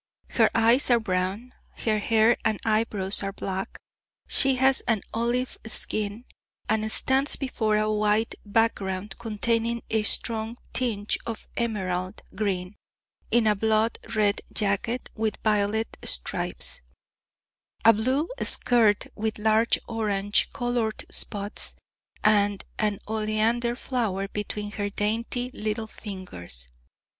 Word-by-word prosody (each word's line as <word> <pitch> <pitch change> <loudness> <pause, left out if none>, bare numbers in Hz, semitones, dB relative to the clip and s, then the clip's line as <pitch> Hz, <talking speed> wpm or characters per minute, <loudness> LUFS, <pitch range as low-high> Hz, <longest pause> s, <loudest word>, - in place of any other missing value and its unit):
Her - - +4
eyes 230 +5 +4
are 240 -1 +5
brown, 195 +4 -2 0.3
her 215 -2 +2
hair 225 +2 +4
and 215 -2 0
eyebrows 215 -3 +2
are 195 -1 -2
black, 190 -1 -4 0.5
she 270 -1 +4
has 265 +1 +3
an 225 -4 +1
olive 240 +3 -1
skin, 215 +1 -2 0.4
and 220 0 0
stands 265 +5 +3
before 220 -6 0
a 215 0 +1
white 215 +1 +1
background 205 -3 -1
containing 230 +1 -1
a 220 -1 +2
strong 225 +2 0 0.2
tinge 215 -5 -1
of 225 -2 -6
emerald 185 -6 -2
green, 190 -2 -2 0.5
in 235 -1 +3
a 215 - +5
blood 220 +2 +1 0.2
red 205 -1 +2
jacket 210 +4 -1
with 220 -1 -1
violet 215 +1 +1
stripes, - - -1 1.0
a 230 - +9
blue 260 +9 0
skirt 225 -4 +5
with 220 0 -3
large 220 +2 +3
orange 205 -3 +1
coloured 240 -4 -2
spots, 205 0 -2 0.5
and 205 -2 +3 0.2
an 210 -2 +1
oleander 220 +2 0
flower 220 -7 -2
between 210 0 -4
her 205 -1 -3
dainty 230 +4 -1
little 215 +1 -2
fingers. 90 - -8
215 Hz, 115 wpm, -26 LUFS, 205-230 Hz, 1.0 s, a